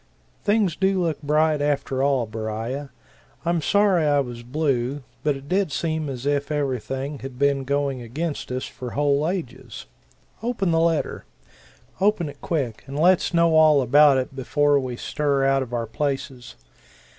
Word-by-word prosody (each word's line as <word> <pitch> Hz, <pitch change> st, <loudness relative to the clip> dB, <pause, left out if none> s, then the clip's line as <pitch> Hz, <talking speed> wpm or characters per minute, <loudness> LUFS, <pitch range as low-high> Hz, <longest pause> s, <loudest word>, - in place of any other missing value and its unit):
"Things 205 Hz, -4 st, +2 dB
do 190 Hz, 0 st, +1 dB
look 165 Hz, -4 st, -1 dB
bright, 150 Hz, 0 st, +2 dB
after 140 Hz, -2 st, 0 dB
all, 135 Hz, -3 st, +2 dB
Beriah. 115 Hz, +5 st, -4 dB, 0.6 s
I'm 170 Hz, -1 st, +1 dB
sorry 200 Hz, -1 st, +3 dB
I 145 Hz, -1 st, +3 dB
was 120 Hz, -3 st, -4 dB
blue, 135 Hz, 0 st, -1 dB, 0.2 s
but 150 Hz, -2 st, +1 dB
it 135 Hz, +1 st, -10 dB
did 190 Hz, -1 st, +1 dB
seem 160 Hz, -1 st, -2 dB
as 130 Hz, -1 st, -6 dB
if 145 Hz, +1 st, 0 dB
everything 135 Hz, 0 st, -2 dB
had 135 Hz, -2 st, -8 dB
been 140 Hz, 0 st, +2 dB
going 140 Hz, -1 st, -1 dB
against 145 Hz, +5 st, -4 dB
us 130 Hz, 0 st, -2 dB
for 125 Hz, -2 st, -8 dB
whole 145 Hz, +2 st, +2 dB
ages. 130 Hz, -, -6 dB, 0.6 s
Open 225 Hz, -6 st, -1 dB
the 165 Hz, -, +3 dB
letter 165 Hz, -2 st, 0 dB, 0.7 s
open 190 Hz, -5 st, +2 dB
it 145 Hz, -, -13 dB
quick, 135 Hz, -10 st, -2 dB
and 135 Hz, +1 st, -6 dB
let's 175 Hz, +3 st, +3 dB
know 170 Hz, -1 st, +3 dB
all 155 Hz, -3 st, +6 dB
about 140 Hz, +2 st, +6 dB
it 130 Hz, +1 st, -3 dB
before 145 Hz, +2 st, +2 dB
we 130 Hz, -2 st, -4 dB
stir 140 Hz, +1 st, 0 dB
out 135 Hz, 0 st, +3 dB
of 125 Hz, -2 st, -5 dB
our 120 Hz, -1 st, -2 dB
places. 135 Hz, +1 st, -4 dB
145 Hz, 160 wpm, -23 LUFS, 130-160 Hz, 0.7 s, all